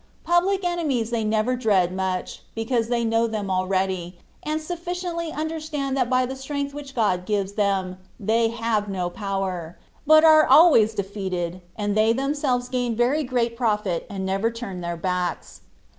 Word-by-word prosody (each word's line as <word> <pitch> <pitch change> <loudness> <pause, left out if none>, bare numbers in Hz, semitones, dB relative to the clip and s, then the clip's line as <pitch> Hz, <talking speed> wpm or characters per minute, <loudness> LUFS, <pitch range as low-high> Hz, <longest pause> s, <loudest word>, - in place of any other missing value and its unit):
Public 370 +3 +2
enemies 295 -10 -1
they 230 -2 0
never 215 +3 +1
dread 195 -7 +2
much, 185 -1 -3
because 225 0 0
they 235 -1 0
know 225 +1 +2
them 210 -3 -3
already, 185 -1 -1 0.2
and 305 +1 -2
sufficiently 345 0 -4
understand 310 -3 -3
that 255 -3 +1
by 255 0 +3
the 260 +1 -5
strength 280 +1 -4
which 280 -2 -9
God 195 -6 +1
gives 200 0 -1
them 195 -3 0 0.2
they 225 +3 +2
have 225 -2 -1
no 180 -2 -2
power, 190 -4 -4 0.3
but 310 +1 +7
are 310 -1 +7
always 230 -10 +6
drfeated, 190 -3 -3
and 205 -1 -2
they 220 +1 +4
themselves 270 -1 -1
gain 245 -2 -1
very 255 +7 +2
great 240 -3 -1
profit 210 -7 -1
and 195 -1 -4
never 195 +4 0
turn 230 -6 -6
their 170 0 -4
backs. 180 0 -3
225 Hz, 160 wpm, -24 LUFS, 195-275 Hz, 0.3 s, but